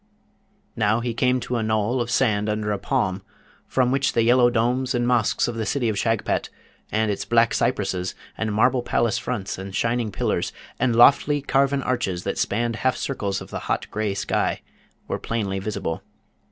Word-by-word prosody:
Now, 110 0 +2
he 120 -1 -2
came 125 +2 +2
to 125 - -2
a - - -1
knoll 110 +3 0
of 120 - -3
sand 110 -4 +1
under 105 0 -1
a 100 - -1
palm, 100 -4 -1 0.5
from 125 -1 +1
which 135 +1 +1
the 115 - +3
yellow 120 +1 +5
domes 125 +2 0
and 120 0 +1
mosques 120 -3 +2
of 120 - -2
the 115 -1 -3
city 125 -5 0
of 110 - -1
Shagpat, 115 +1 0 0.4
and 110 0 +1
its 100 - -3
black 115 -1 +3
cypresses, 95 -6 -1 0.2
and 110 -1 -2
marble 120 +4 +3
palace 120 0 +1
fronts, 115 -6 -4
and 95 0 -7
shining 115 -2 0
pillars, - - -1 0.3
and 120 -1 +2
lofty 140 +4 +5
carven 140 0 +1
arches 100 -9 -1
that - - -3
spanned 115 +1 0
half 130 +1 +1
circles 100 -8 -2
of - - -10
the - - -3
hot - - 0
grey 105 -2 -1
sky, 95 - -1 0.5
were - - -2
plainly 100 -4 -2
visible. 95 -5 -3
115 Hz, 180 wpm, -23 LUFS, 105-125 Hz, 0.5 s, yellow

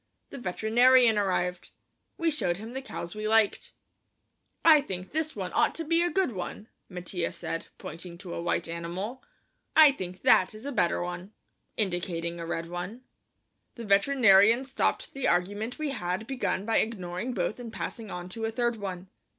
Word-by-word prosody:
The 275 - -7
veterinarian 235 +3 +4
arrived. 180 -2 -1 0.5
We 335 -1 +1
showed 175 - 0
him 220 +4 -8
the 265 - -4
cows 170 -9 -7
we 215 0 -4
liked. 220 -1 +2 0.9
"I 315 -3 +8
think 185 -7 -6
this 310 0 -2
one 190 -3 -4
ought 305 +1 +2
to 330 - -2
be 330 +2 +2
a 350 - +2
good 375 -6 +1
one," 205 +2 -6 0.2
Mattia 180 -1 -3
said, 165 -1 -5
pointing 170 +2 -8
to 175 -1 -8
a - - -4
white 170 - -1
animal. 175 +9 -5 0.5
"I 310 -2 +9
think 185 -8 -7
that 185 +3 +5
is 215 +4 -11
a 285 - -3
better 175 -8 +1
one," 175 0 -4
I 180 - -12
said, 215 +1 -6
indicating 170 -2 -3
a 165 - -5
red 165 0 -3
one. 180 +8 -6 0.7
The 235 - -7
veterinarian 215 +2 +5
stopped 270 +1 -1
the 275 - -1
argument 205 +7 0
we 305 -2 -2
had 185 -3 -3
begun 250 -6 -2
by 225 - +2
ignoring 205 +2 -3
both 205 +4 -1
and 235 -2 -7
passing 220 0 -5
on 180 -1 -6
to 225 +4 -4
a - - 0
third 235 0 0
one. 190 -3 -6
205 Hz, 180 wpm, -28 LUFS, 180-250 Hz, 0.9 s, I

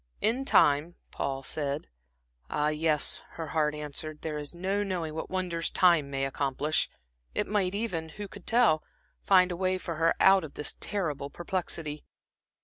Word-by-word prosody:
"In 245 +5 +1
time," 150 - +4 0.2
Paul 135 -1 -3
said. 145 0 -1 0.6
Ah, 150 0 +1
yes, 155 -1 +2
her 160 -2 -6
heart 150 -1 +1
answered, 150 +1 -5
there 155 -2 -3
is 150 +3 -6
no 190 +3 -1
knowing 175 -6 -3
what 160 - -5
wonders 180 -3 -1
time 170 -6 +4
may 135 -1 -1
accomplish. 140 +3 0 0.5
It - - +1
might 200 -2 0
even 180 -7 -2
who 205 +6 -7
could 200 -1 -13
tell? 225 -10 +4 0.4
find 185 -2 +5
a - - -2
way 185 +1 +1
for 170 -3 -5
her 165 +1 +3
out 190 -1 +6
of 155 - -9
this 150 - -1
terrible 150 -9 -2
perplexity. 165 -2 -3
160 Hz, 160 wpm, -29 LUFS, 150-185 Hz, 0.6 s, out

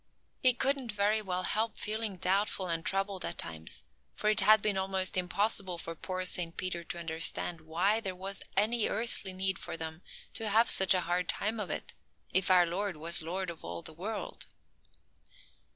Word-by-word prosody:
He 255 -1 +6
couldn't 265 -2 +2
very 210 +1 +2
well 185 -2 -2
help 220 +4 0
feeling 215 -1 -1
doubtful 190 +2 0
and 165 -2 -2
troubled 195 -1 -1
at - - -3
times, 80 0 -1 0.3
for 210 - +1
it 215 - +3
had 215 +2 +6
been 205 0 0
almost 190 0 0
impossible 185 0 0
for 165 0 -5
poor 185 +3 -4
Saint 175 -2 -2
Peter 180 -2 -3
to 170 - -5
understand 165 0 -2
why 175 +7 +1
there 190 -4 -4
was 195 +2 -5 0.2
any 220 +2 +3
earthly 220 -3 -2
need 190 0 -2
for - - -5
them 160 +1 -6 0.3
to 225 -2 -1
have 225 +3 +5
such 190 0 +8
a 180 - +2
hard 175 +1 -1
time 215 +2 0
of 200 -5 -3
it, - - -4 0.4
if 185 +1 +4
our 180 -1 +6
Lord 185 +1 -3
was 165 +2 +1
lord 180 +3 -3
of 165 - -13
all 85 0 -6
the 160 - -7
world. 205 +7 -5
190 Hz, 185 wpm, -31 LUFS, 175-210 Hz, 0.4 s, such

